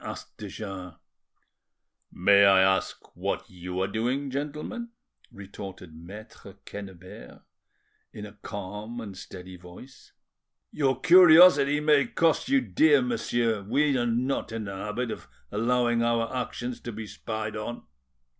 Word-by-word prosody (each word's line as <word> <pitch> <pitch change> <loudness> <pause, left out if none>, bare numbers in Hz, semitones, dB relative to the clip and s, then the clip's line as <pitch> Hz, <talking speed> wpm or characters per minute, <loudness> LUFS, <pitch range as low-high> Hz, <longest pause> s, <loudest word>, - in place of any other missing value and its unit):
asked - - -8
de 105 - -7
Jars. 95 -4 -8 1.2
"May 100 +2 +5
I 95 -1 +6
ask 95 0 0
what - - -3
you 90 0 -6
are 95 - +1
doing, 125 +7 -2
gentlemen?" 150 - -5 0.4
retorted 95 -3 -10
Maitre 95 +3 -12
Quennebert, 95 -10 -11 0.7
in 105 - -8
a 105 - -10
calm 105 +2 -7
and 105 -4 -8
steady 95 0 -10
voice. 90 +9 -15 0.6
"Your 135 -4 0
curiosity 165 -4 +7
may 150 -2 +3
cost 165 - +1
you 275 -1 +4
dear, 150 - +3
monsieur; 120 -3 -1
we 140 +8 +1
are 120 -1 0
not 120 +1 -1
in 115 -1 -4
the 100 -1 -6
habit 110 +5 -4
of - - -8 0.2
allowing 120 +2 +1
our 115 +1 0
actions 125 -1 -4
to 120 - -7
be 110 0 -7
spied 110 0 -5
on." 110 +3 -6
115 Hz, 135 wpm, -27 LUFS, 100-130 Hz, 1.2 s, curiosity